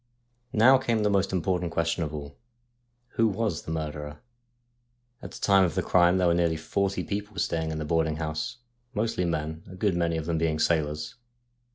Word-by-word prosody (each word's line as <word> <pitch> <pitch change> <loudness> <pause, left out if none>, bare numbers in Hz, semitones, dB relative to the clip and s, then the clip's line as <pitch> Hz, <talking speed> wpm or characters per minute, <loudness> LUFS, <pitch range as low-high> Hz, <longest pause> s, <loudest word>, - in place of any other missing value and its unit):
Now 130 +5 +6
came 115 -4 0
the 105 - +2
most 100 -1 +1
important 90 -1 0
question 85 +1 0
of 75 - -4
all: 70 -2 -7 0.7
Who 115 -2 +2
was 105 -3 -1
the - - -7
murderer? 75 -2 -4 1.0
At - - -7
the - - -10
time 100 -1 +5
of 85 -4 0
the - - 0
crime 90 0 +4
there 90 - +2
were 85 - +4
nearly 85 -2 +1
forty 100 +5 -1
people 105 0 -5
staying 80 -4 -1
in 80 - -3
the 80 - -3
boarding 80 0 +1
house, 75 +8 -3 0.4
mostly 105 -4 0
men, 80 -1 -3
a 95 - -9
good 95 -1 +1
many 85 -1 0
of 80 - -4
them 85 -1 -1
being 80 -1 +1
sailors. 75 -2 0
85 Hz, 190 wpm, -27 LUFS, 80-100 Hz, 1.0 s, Now